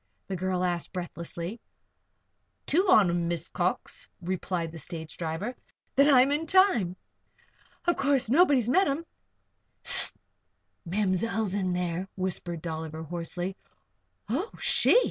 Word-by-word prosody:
the 195 - -4
girl 185 0 -1
asked, 175 -4 -1
breathlessly. 175 +3 -5 1.0
"Two 370 +6 +2
on 210 - +7
'em, 170 0 0
Miss 170 -1 -2
Cox," 180 +1 -2
replied 180 -2 -3
the 165 - -8
stage 160 +1 -6
driver. 170 +9 -3 0.4
"Then 280 +2 +6
I'm 265 +1 +6
in 305 +3 -1
time. 310 - +4 0.9
Of 345 - +2
course, 275 -2 +2
nobody's 275 -3 +4
met 370 +9 +4
'em?" 290 +4 -2 0.8
"Hist! - - +5 0.7
Ma'mzell's 205 +2 0
in 185 -3 0
there," 180 +1 -2
whispered 180 -3 -3
Dolliver, 160 -1 -5
hoarsely. 175 +3 -4 0.7
"Oh! 300 - -1
She!" 485 - +5
185 Hz, 125 wpm, -28 LUFS, 170-255 Hz, 1.0 s, on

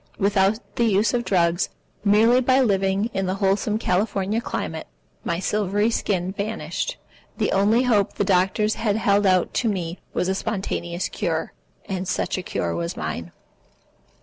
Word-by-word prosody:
Without 200 0 +2 0.2
the 235 - +3
use 210 +1 +2
of 240 -1 +1
drugs, 175 -4 +1 0.3
merely 225 +5 +5
by 260 +1 +3
living 200 -2 +1
in 195 -1 -1
the 185 - 0
wholesome 200 +2 +1
California 205 +1 0
climate, 160 -8 -4 0.4
my 170 - -1
silvery 205 +3 0
skin 185 -5 -1
vanished. 220 - -3 0.4
The - - 0
only 210 +5 +3
hope 210 -6 +2
the - - -1
doctors 195 +3 +2
had 210 -3 0
held 205 -2 +3
out 185 -1 +2
to 235 - +1
me 180 -3 -3
was 180 - -1
a 190 - +1
spontaneous 185 -3 -3
cure, 165 -6 -2 0.3
and 190 -1 -4
such - - -1
a 185 - -2
cure 85 - -2
was 85 0 -3
mine. 80 +2 -4
195 Hz, 155 wpm, -23 LUFS, 185-215 Hz, 0.4 s, merely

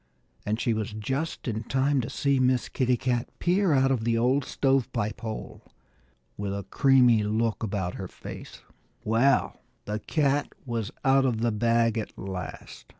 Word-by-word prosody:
And 110 +2 0
she 120 - +1
was 110 -1 -3
just 135 +11 -3
in 110 -1 -2
time 135 +1 +1
to 120 - -5
see 140 -1 +1
Miss 130 -1 +2
Kitty 125 -2 +1
Cat 120 -1 -1
peer 180 +1 +2
out 135 -1 +3
of 125 -4 0
the 115 0 +1
old 130 +4 +2
stove 135 -2 +1
pipe 110 -4 -3
hole, 110 -2 -6 0.8
with 100 -1 -3
a 100 - -5
creamy 125 -5 +5
look 110 +2 0
about 95 -5 -2
her 95 -2 -6 0.2
mouth. - - -8 0.4
Well, 120 +5 +2 0.2
the 105 +1 -3
cat 145 +2 0
was 115 -4 -2 0.2
out 135 0 +5
of 115 -4 0
the 120 0 +2
bag 115 +1 +2
at 110 - -7
last. 90 -9 -7
120 Hz, 165 wpm, -27 LUFS, 110-135 Hz, 0.8 s, creamy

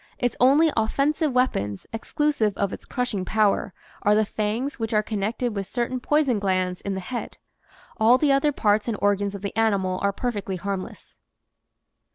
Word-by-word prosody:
Its 245 -2 -1
only 290 +6 +5
offensive 280 +7 +1
weapons 105 - 0
(exclusive 225 - 0
of 200 -1 -1
its - - -8
crushing 245 -6 -2
power) 210 0 +1 0.3
are 210 0 +4
the 215 0 +3
fangs 220 +7 -2
which 225 -1 -2
are 210 - +3
connected 220 +3 -2
with 195 -1 -3
certain 245 +4 -2
poison 275 -4 +2
glands 185 -2 -1
in 200 -1 -3
the - - -3
head. 240 +6 -6 0.6
All 230 +3 +5
the 285 +1 +2
other 275 +2 +3
parts 210 -5 +1
and 225 -3 -1
organs 205 0 +1
of 200 - -8
the 200 - -4
animal 200 -5 +1
are 200 - +2
perfectly 205 -3 -3
harmless. 195 +1 -6
215 Hz, 170 wpm, -24 LUFS, 200-250 Hz, 0.6 s, only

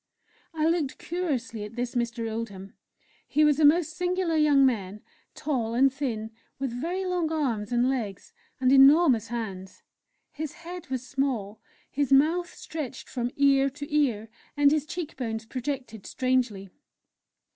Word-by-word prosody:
I 315 -2 -1
looked 320 -4 0
curiously 270 -11 -3
at 210 +2 -9
this 245 0 -3
Mr. 235 -2 -2
Oldham; 205 -4 -6 0.5
he 305 +1 +3
was 300 -1 +3
a - - +3
most 325 +2 +4
singular 360 -2 0
young 295 -3 +5
man 210 -5 -1 0.3
tall 235 -6 -2
and 265 +2 +4
thin, 230 -6 -3 0.3
with 270 -2 -3
very 340 +10 -3
long 355 -3 -1
arms 245 -9 -1
and 240 +1 +2
legs, 225 -8 -3 0.3
and 255 0 +3
enormous 270 -3 +6
hands. 195 -6 -6 0.5
His 305 -1 -5
head 345 +1 -9
was 260 -1 -3
small, 250 -6 -2 0.3
his 285 -1 -1
mouth 325 +6 +3
stretched 295 -5 -7
from 245 -2 -2
ear 275 -1 +4
to 290 +2 -6
ear, 235 -8 +1 0.3
and 285 -1 +5
his 305 -1 0
cheek 340 -2 -5
bones 225 -3 -3
projected 250 -3 -5
strangely. 245 -7 -1
270 Hz, 145 wpm, -27 LUFS, 230-305 Hz, 0.5 s, enormous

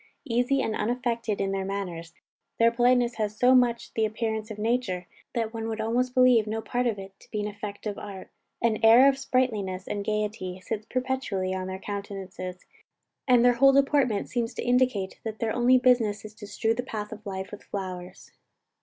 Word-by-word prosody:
Easy 245 +3 +1
and 220 - -1
unaffected 235 -1 -1
in 195 0 0
their 195 0 -1
manners, 180 -4 -5 0.4
their 230 0 +5
politeness 245 0 +2
has 210 -1 -2
so 250 +1 +5
much 245 -2 +2
the 225 - 0
appearance 220 0 -2
of 215 - -7
nature, 210 -5 -1 0.3
that 225 -1 -1
one 225 0 -4
would 225 -1 -4
almost 245 +3 0
believe 250 -4 +5
no 220 +1 -2
part 245 +2 -1
of 225 -3 -1
it 195 0 -9
to - - -20
be 210 -1 -2
the 210 - -2
effect 205 0 -8
of 205 -2 -3
art. 195 -2 -9 0.3
An 225 -2 +2
air 235 +4 +8
of 275 -1 +2
sprightliness 210 -9 -1
and 205 -1 -3
gaiety 210 -3 -2
sits 215 +2 -5
perpetually 255 -8 -2
on 185 0 -3
their 190 0 -4
countenances, 190 -2 -6 0.6
and 245 -2 +5
their 245 - +6
whole 275 +3 +5
deportment 275 -6 +2
seems 235 -2 -2
to - - -3
indicate 245 -6 +1
that 220 -1 -5
their 225 -1 -1
only 245 +1 +5
business 235 -5 +2
is 215 - -9
to 210 -1 -11
"strew 225 +2 0
the 240 - -2
path 215 -4 -6
of 215 - -9
life 190 -1 -5
with 210 - -9
flowers." 185 -2 -7
220 Hz, 195 wpm, -27 LUFS, 200-245 Hz, 0.6 s, air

